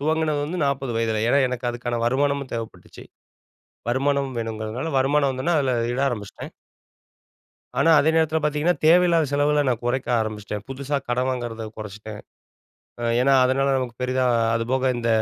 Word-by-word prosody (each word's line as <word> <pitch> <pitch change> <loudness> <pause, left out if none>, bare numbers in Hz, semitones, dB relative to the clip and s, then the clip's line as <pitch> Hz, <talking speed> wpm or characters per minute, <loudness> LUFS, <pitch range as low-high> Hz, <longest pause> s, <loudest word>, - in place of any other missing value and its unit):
துவங்குனது 155 0 0
வந்து 170 +5 -4
40 135 -3 -1
வயதில. 110 -1 0
ஏன்னா 140 +4 +3
எனக்கு 125 -1 -3
அதுக்கான 120 0 -3
வருமானமும் 140 +2 0
தேவைப்பட்டுச்சு. 115 -1 -7 0.8
வருமானம் 135 +1 0
வேணும்ங்கறதுனால 115 +6 -4
வருமானம் 140 +1 +2
வந்தவுடனே 135 +6 0
அதுல 130 -3 +1 0.2
இட 130 - -2
ஆரம்பிச்சிட்டேன். 105 -6 -6 1.3
ஆனா 165 - +4
அதே 155 - +3
நேரத்துல 160 -1 +2
பார்த்தீங்கன்னா, 150 +4 +1
தேவையில்லாத 170 -1 +5
செலவுகளை 145 +1 +2
நான் 120 -2 -1
குறைக்க 125 +2 -1
ஆரம்பிச்சிட்டேன். 105 -1 -4
புதுசா 140 +2 -3
கடன் 125 +1 0
வாங்கறதை 120 -3 -4
குறைச்சிட்டேன். 105 0 -8 0.8
அ - - -4 0.2
ஏன்னா 135 +1 +4
அதனால 135 +2 +2
நமக்கு 125 -2 -3
பெரிதா, 130 0 0 0.3
அது 115 - 0
போக 130 0 +2
இந்த 120 -1 -2
130 Hz, 145 wpm, -23 LUFS, 120-145 Hz, 1.3 s, தேவையில்லாத